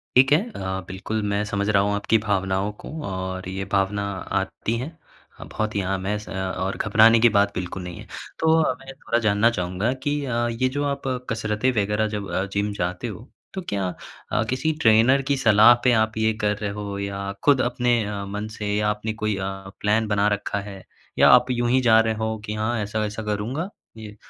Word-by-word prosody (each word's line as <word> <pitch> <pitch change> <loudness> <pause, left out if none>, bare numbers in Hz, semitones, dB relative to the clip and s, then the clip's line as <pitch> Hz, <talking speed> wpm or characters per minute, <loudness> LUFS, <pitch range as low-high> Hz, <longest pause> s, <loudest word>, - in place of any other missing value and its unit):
ठीक 135 +2 +6
है। 155 - +6 0.2
अ, - - -6 0.3
बिल्कुल 105 +4 -3
मैं 100 +1 0
समझ 100 -1 -2
रहा 100 -2 +4
हूँ 100 0 0
आपकी 105 +2 +2
भावनाओं 95 0 0
को - - -9 0.2
और 95 -1 -4
ये 95 +1 -4
भावना 100 +1 +1 0.4
आती 115 - -3
हैं, 155 +7 -6 0.4
बहुत 110 0 -3
ही 100 - +1
आम 95 0 -2
हैं 105 +1 0
स 105 - -10
अ, 100 - -6
और 95 0 -3
घबराने 110 +2 +5
की 120 +1 +6
बात 100 -1 +2
बिल्कुल 90 0 -4
भी 90 - -6
नहीं 85 - -9
है। - - -11 0.3
तो 160 0 +3
अ, 130 - +1
मैं 135 0 -10
थोड़ा 115 - 0
जानना 105 +2 +4
चाहूँगा 95 +2 -1
कि 145 - 0
अ, 120 -2 0
ये 130 +3 0
जो 145 - 0
आप 140 0 -4 0.3
कसरत 110 0 -2
वग़ैरह 105 +1 +1
जब 105 -2 -5
अ, 95 - 0
जिम 100 +1 0
जाते 90 +3 -3
हो, 115 +3 -8 0.3
तो 190 - -4
क्या 100 -2 -1 0.4
अ, 110 - +2
किसी 135 +5 0
ट्रेनर 115 +5 +5
की 140 - +2
सलाह 110 -2 +7
पे 125 - +5
आप 110 0 -5
ये 110 0 +2
कर 105 0 +2
रहे 105 -1 -3
हो 100 -1 -5
या 100 0 -4
खुद 140 -3 +5
अपने 120 -1 +1
अ, 100 -1 -4
मन 105 +2 -4
से 105 0 -1
आपने 110 +1 -4
कोई 110 -1 +1
अ, 95 - -3 0.4
प्लान 110 +2 +2
बना 105 0 +2
रखा 100 0 -3
है? 95 -2 -10 0.4
या - - +7
आप 125 - +6
यूँ 120 -1 0
ही 130 +1 +3
जा 115 -2 +6
रहे 110 0 +2
हो 110 0 -1
कि 105 - -4
हाँ, 110 +2 -1
ऐसा-ऐसा 105 +1 -3
करूँगा 110 - -3 0.3
ये 105 -1 -9
105 Hz, 210 wpm, -23 LUFS, 100-115 Hz, 0.4 s, सलाह